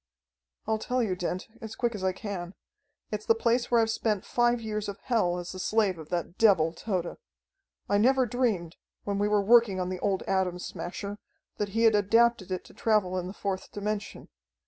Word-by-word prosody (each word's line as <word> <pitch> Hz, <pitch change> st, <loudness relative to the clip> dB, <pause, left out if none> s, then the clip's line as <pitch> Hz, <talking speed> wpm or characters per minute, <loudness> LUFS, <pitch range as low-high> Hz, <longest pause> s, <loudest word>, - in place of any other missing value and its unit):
"I'll 220 Hz, 0 st, 0 dB
tell 250 Hz, +2 st, 0 dB
you, 190 Hz, -5 st, -1 dB
Dent, 180 Hz, +1 st, -3 dB
as 220 Hz, -1 st, -7 dB
quick 240 Hz, -1 st, 0 dB
as 200 Hz, -3 st, -6 dB
I 190 Hz, -, +2 dB
can. 185 Hz, -2 st, -6 dB, 0.6 s
It's 210 Hz, 0 st, -4 dB
the 225 Hz, -, +5 dB
place 235 Hz, +1 st, +1 dB
where 235 Hz, -, +4 dB
I've 225 Hz, -1 st, +2 dB
spent 215 Hz, -3 st, -1 dB
five 240 Hz, 0 st, +2 dB
years 215 Hz, -2 st, -3 dB
of 200 Hz, -, -6 dB
hell 195 Hz, -8 st, 0 dB
as 175 Hz, 0 st, -5 dB
the 185 Hz, -, -8 dB
slave 200 Hz, -3 st, +1 dB
of 155 Hz, -, -10 dB
that 175 Hz, 0 st, -3 dB
devil, 180 Hz, -8 st, +4 dB
Tode. 180 Hz, -2 st, -3 dB, 0.7 s
I 205 Hz, -, +2 dB
never 260 Hz, +3 st, +4 dB
dreamed, 215 Hz, -8 st, -1 dB, 0.3 s
when 200 Hz, -1 st, -2 dB
we 205 Hz, -, +2 dB
were 210 Hz, -1 st, +2 dB
working 225 Hz, -3 st, +5 dB
on 180 Hz, 0 st, -1 dB
the 185 Hz, -1 st, -4 dB
old 195 Hz, -2 st, 0 dB
Atom 190 Hz, -2 st, 0 dB
Smasher, 200 Hz, +3 st, -6 dB, 0.4 s
that 205 Hz, -1 st, -1 dB
he 230 Hz, -, +3 dB
had 225 Hz, -1 st, +6 dB
adapted 225 Hz, 0 st, +3 dB
it 185 Hz, -, -2 dB
to -, -, -16 dB
travel 210 Hz, -5 st, +1 dB
in 180 Hz, -, -5 dB
the 185 Hz, -, -6 dB
fourth 195 Hz, -2 st, -4 dB
dimension. 210 Hz, 0 st, -4 dB
205 Hz, 200 wpm, -28 LUFS, 185-225 Hz, 0.7 s, had